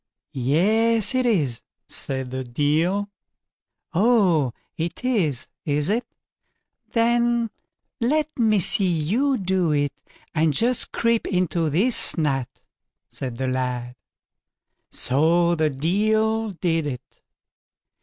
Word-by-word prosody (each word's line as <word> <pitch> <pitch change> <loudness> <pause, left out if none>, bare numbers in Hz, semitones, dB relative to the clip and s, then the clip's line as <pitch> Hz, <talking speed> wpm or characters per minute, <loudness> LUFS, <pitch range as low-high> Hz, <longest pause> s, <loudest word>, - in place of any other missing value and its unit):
"Yes 210 - +2
it 255 -1 +1
is", 145 - 0 0.3
said 130 -2 -4
the 130 0 -3
Deil. 160 +11 0 0.8
"Oh! 185 - +3 0.2
it 170 +9 -4
is, 175 - 0 0.2
is 145 +3 0
it? 230 +2 0 0.9
then 235 0 +2 0.5
let 300 +4 0
me 215 -3 +3
see 195 +1 +2
you 220 - +1
do 185 -4 0
it, 145 -1 0 0.4
and 160 -1 +2
just 240 - +1
creep 230 -1 +1
into 175 -3 0
this 200 - +2
nut", 135 -5 0 0.6
said 125 -3 -6
the 130 - -2
lad. 125 -1 -2 0.9
So 165 +6 +2
the 155 -2 +1
Deil 215 +9 +1
did 165 -3 -1
it. 130 -1 -8
175 Hz, 105 wpm, -23 LUFS, 145-225 Hz, 0.9 s, Oh